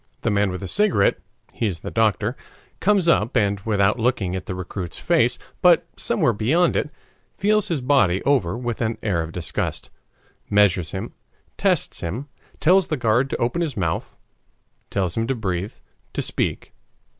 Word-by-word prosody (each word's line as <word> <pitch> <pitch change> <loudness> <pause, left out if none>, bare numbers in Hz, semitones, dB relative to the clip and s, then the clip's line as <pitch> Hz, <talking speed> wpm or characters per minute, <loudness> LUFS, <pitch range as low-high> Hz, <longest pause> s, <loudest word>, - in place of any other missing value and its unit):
The 115 - 0
man 100 -1 +2
with 90 +1 -5
the 95 - -4
cigarette 195 - +2 0.3
he 115 - -1
is 90 -5 -4
the - - -6
doctor 110 +1 +1 0.4
comes 200 -4 +3
up, 120 -8 +3
and 100 -1 +1
without 105 +2 +1
looking 110 -6 0
at 95 - -5
the 90 - -3
recruit's 90 -1 -6
face, - - +2 0.2
but - - +5
somewhere - - +2
beyond 150 - +2
it, 150 - 0 0.5
feels 210 +1 +2
his 165 -7 -1
body 105 -9 +3
over 120 -10 +1
with 120 -2 -4
an 115 -1 -1
air 95 -6 +1
of 80 0 -5
disgust, 85 -2 -3 0.6
measures 100 -5 +3
him, - - -5 0.4
tests - - 0
him, 120 - -4 0.3
tells 185 +2 +4
the 155 - -1
guard 120 +2 +2
to - - -2
open 120 +9 -1
his 150 -8 -2
mouth, 85 -4 -2 0.7
tells 95 -4 -1
him 115 0 -1
to 135 - 0
breathe, 95 -3 -3 0.4
to - - -1
speak. - - -2
110 Hz, 165 wpm, -22 LUFS, 95-135 Hz, 0.7 s, but